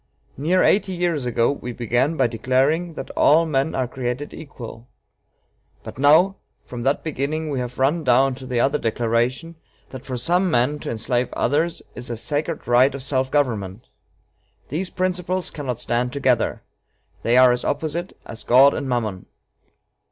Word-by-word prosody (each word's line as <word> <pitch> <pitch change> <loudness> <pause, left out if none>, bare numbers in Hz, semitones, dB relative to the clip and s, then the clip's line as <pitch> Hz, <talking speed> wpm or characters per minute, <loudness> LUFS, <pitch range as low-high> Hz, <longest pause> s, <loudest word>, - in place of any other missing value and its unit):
Near 170 +7 +2
eighty 195 -1 +2
years 170 -7 -1
ago 115 +1 +2
we 125 -3 -6
began 120 +7 0
by - - +3
declaring 130 +9 0
that - - -7
all 160 +3 +4
men 150 0 0
are 130 -2 0
created 125 +3 -4
equal; 125 -6 -10 1.0
but - - -10
now, 160 +8 +5 0.3
from 120 -1 -7
that 135 +4 0
beginning, 155 +1 -3
we 135 - -1
have 125 0 -5
run 145 +5 +1
down 130 +1 +3
to 130 - -8
the 125 -2 -1
other 140 +4 +2
declaration, 120 +7 -1 0.3
that 130 -1 -8
for 130 -2 -4
some 175 +9 +1
men 130 +2 +1
to - - -6
enslave 120 +2 -1
others 160 +4 0
is 125 - -7
a 120 - -4
'sacred 150 +6 -3
right 125 +3 +4
of 135 - -6
self 130 -1 0
government.' 115 -8 -1 0.8
These 175 +6 -3
principles 185 -1 -2
cannot 130 -6 -4
stand 125 +1 -1
together. 130 -4 0 0.6
They 120 +2 +2
are 130 -1 +7
as 125 0 -1
opposite 160 +4 -3
as 115 - -8
God 135 +3 +6
and 140 -2 -4
Mammon." 110 -7 -2
135 Hz, 160 wpm, -22 LUFS, 120-155 Hz, 1.0 s, are